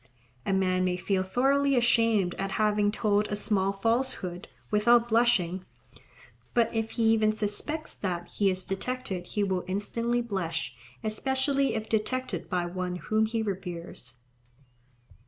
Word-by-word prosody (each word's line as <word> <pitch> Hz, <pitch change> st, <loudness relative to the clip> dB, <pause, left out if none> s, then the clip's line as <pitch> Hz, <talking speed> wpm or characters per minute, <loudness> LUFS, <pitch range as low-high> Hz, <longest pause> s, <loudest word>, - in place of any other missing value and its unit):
A -, -, +2 dB
man 185 Hz, -1 st, +2 dB
may 180 Hz, -1 st, 0 dB
feel 190 Hz, +1 st, 0 dB
thoroughly 275 Hz, +8 st, +2 dB
ashamed 230 Hz, -6 st, +3 dB
at 195 Hz, 0 st, -2 dB
having 210 Hz, -1 st, +2 dB
told 210 Hz, -1 st, +1 dB
a 210 Hz, -, -2 dB
small 195 Hz, -2 st, +1 dB
falsehood, 200 Hz, -4 st, -1 dB, 0.2 s
without 235 Hz, +3 st, +4 dB
blushing; 210 Hz, -6 st, +2 dB, 0.9 s
but 235 Hz, -1 st, +3 dB
if 225 Hz, -1 st, -1 dB
he 230 Hz, -, 0 dB
even 215 Hz, -1 st, +3 dB
suspects 215 Hz, +9 st, -2 dB
that 175 Hz, -3 st, -3 dB
he 200 Hz, -2 st, +1 dB
is 185 Hz, 0 st, 0 dB
detected 195 Hz, -3 st, -4 dB
he 210 Hz, -, -1 dB
will 190 Hz, -2 st, 0 dB
instantly 230 Hz, +5 st, -1 dB
blush, 170 Hz, -, -3 dB, 0.3 s
especially 265 Hz, +5 st, +1 dB
if 220 Hz, 0 st, -3 dB
detected 255 Hz, +4 st, -2 dB
by 180 Hz, -2 st, 0 dB
one 180 Hz, 0 st, -3 dB
whom 215 Hz, +4 st, +1 dB
he 225 Hz, 0 st, -1 dB
reveres. 175 Hz, -, -5 dB
210 Hz, 135 wpm, -28 LUFS, 185-235 Hz, 0.9 s, without